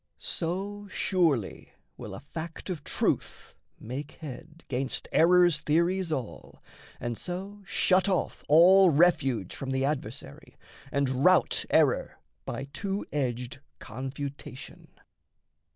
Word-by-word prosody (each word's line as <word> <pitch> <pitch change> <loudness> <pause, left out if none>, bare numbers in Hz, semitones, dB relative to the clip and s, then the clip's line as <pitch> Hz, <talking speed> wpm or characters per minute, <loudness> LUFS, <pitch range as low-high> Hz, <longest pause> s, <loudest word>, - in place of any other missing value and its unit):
So 195 +4 -4
surely 165 - 0 0.2
will - - -8
a - - -8
fact 165 +3 -7
of 155 -5 -5
truth - - -2 0.3
make 135 +6 -6
head 160 +2 -10
'Gainst 130 0 -2
errors' 175 -1 +5
theories 170 +3 +1
all, 130 -7 -6 0.4
and 120 -1 -3
so 195 +3 -6
shut 190 +1 +3
off 185 -3 -1
All 180 +5 +7
refuge 135 - +2
from 135 - -5
the 130 0 0
adversary, 130 - -5 0.3
and 135 -1 0
rout 185 -2 +4
Error - - +2 0.3
by - - -4
two 200 0 -3
edged 125 -3 -2 0.2
confutation. 135 +3 -7
155 Hz, 110 wpm, -28 LUFS, 130-180 Hz, 0.4 s, All